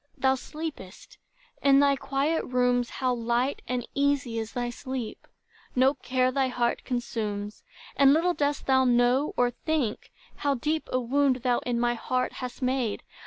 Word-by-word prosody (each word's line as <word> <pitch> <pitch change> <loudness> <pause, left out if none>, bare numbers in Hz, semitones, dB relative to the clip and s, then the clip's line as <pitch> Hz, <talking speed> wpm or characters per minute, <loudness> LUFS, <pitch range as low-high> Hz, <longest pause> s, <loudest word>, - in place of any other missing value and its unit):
Thou 265 -1 +3
sleepest! 285 - -8 0.4
in 275 -1 +5
thy 280 -1 +4
quiet 280 +4 -1
rooms, 245 -1 +1
how 255 -1 -1
light 240 +3 0
And 250 -1 -2
easy 280 -4 0
is 225 0 -5
thy 245 -1 -2
sleep! 250 -2 -6 0.5
No 260 +2 +4
care 255 -1 0
thy 265 0 +1
heart 245 -1 -1
Consumes; 215 -4 -3 0.3
and 275 -1 +6
little 335 +4 +3
dost 290 -3 -1
thou 260 -1 +4
know 245 +3 +2
or 245 0 +3
think, 270 -4 -2 0.3
How 285 -1 0
deep 305 +5 -2
a 255 - +2
wound 260 0 +1
thou 245 -2 +2
in 240 -1 0
my 240 0 +2
heart 255 +2 -1
hast 250 +1 -6
made. 250 -4 -1
255 Hz, 160 wpm, -27 LUFS, 240-275 Hz, 0.5 s, and